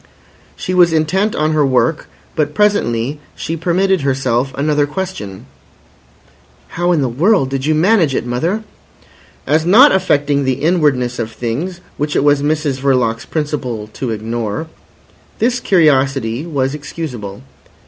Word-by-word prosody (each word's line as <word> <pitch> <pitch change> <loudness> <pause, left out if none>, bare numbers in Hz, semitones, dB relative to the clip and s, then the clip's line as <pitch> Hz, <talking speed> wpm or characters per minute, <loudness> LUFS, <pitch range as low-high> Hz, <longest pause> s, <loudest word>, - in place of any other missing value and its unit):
She 185 - -4
was 175 -2 +4
intent 185 +7 +1
on 155 +1 +1
her 155 -1 +2
work, 140 +4 +1 0.3
but 150 -2 -1
presently 145 - +1 0.2
she 165 - -4
permitted 185 +3 +1
herself 135 -1 0
another 145 +1 +1
question. 145 - -6 1.2
"How 175 +1 0
in 165 -4 +2
the 135 - +1
world 145 - +2
did 135 +1 -2
you 155 - +2
manage 165 - +3
it, - - -1
mother?" 165 - -1 0.8
As 155 +3 +2
not 225 - +7
affecting 145 -6 +1
the 130 -1 +1
inwardness 140 -5 +1
of 115 -1 -3
things, 145 +11 -4 0.2
which 150 +1 -2
it - - +2
was 145 -1 +3
Mrs 150 -2 -1
Verloc's 125 -4 +1
principle 130 -9 -3
to 130 - -4
ignore, 110 +3 -3 0.7
this 245 +2 +1
curiosity 135 - +2
was 135 -4 -1
excusable. 130 -8 -7
145 Hz, 140 wpm, -16 LUFS, 125-170 Hz, 1.2 s, not